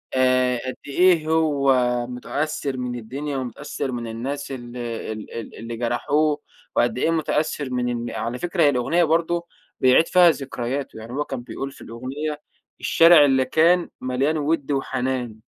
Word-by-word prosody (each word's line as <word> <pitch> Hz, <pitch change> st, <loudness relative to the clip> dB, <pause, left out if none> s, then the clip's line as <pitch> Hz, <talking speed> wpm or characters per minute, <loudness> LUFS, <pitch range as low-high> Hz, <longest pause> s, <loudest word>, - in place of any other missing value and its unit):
آآ 130 Hz, -1 st, +3 dB
قد 130 Hz, -, -3 dB
إيه 165 Hz, +1 st, +3 dB
هو 150 Hz, -4 st, +3 dB, 0.3 s
مُتأثِّر 140 Hz, +2 st, -3 dB
من 125 Hz, -1 st, -3 dB
الدنيا 135 Hz, +5 st, -5 dB
ومُتأثِّر 135 Hz, +1 st, -4 dB
من 120 Hz, -1 st, -4 dB
الناس 135 Hz, +5 st, -4 dB
ال 120 Hz, -1 st, -7 dB
ال 115 Hz, -2 st, -5 dB
ال 115 Hz, -, -7 dB
اللي 115 Hz, 0 st, -6 dB
جرَحوه 145 Hz, +6 st, +1 dB, 0.4 s
وقد 120 Hz, +1 st, +2 dB
إيه 165 Hz, -, +1 dB
مُتأثِّر 150 Hz, -3 st, -1 dB
من 125 Hz, -1 st, -1 dB
إن 120 Hz, -1 st, -3 dB
على 120 Hz, +2 st, -4 dB
فكرة 175 Hz, +1 st, 0 dB
هي 145 Hz, -, +6 dB
الأغنية 140 Hz, +7 st, +2 dB
برضه 170 Hz, +2 st, +1 dB, 0.3 s
بيعِيد 130 Hz, +6 st, +5 dB
فيها 180 Hz, -1 st, +6 dB
ذكرياته، 135 Hz, -2 st, -3 dB
يعني 115 Hz, +2 st, -9 dB
هو 145 Hz, +2 st, -1 dB
كان 130 Hz, -3 st, -5 dB
بيقول 135 Hz, +2 st, -6 dB
في -, -, -16 dB
الأغنية: 140 Hz, +6 st, -5 dB, 0.4 s
"الشارع 165 Hz, -3 st, +6 dB
اللي 130 Hz, -1 st, +3 dB
كان 170 Hz, +5 st, +3 dB
مليان 135 Hz, +5 st, 0 dB
وِد 150 Hz, -1 st, -1 dB
وحنان 130 Hz, -4 st, -2 dB
135 Hz, 155 wpm, -23 LUFS, 125-155 Hz, 0.4 s, هي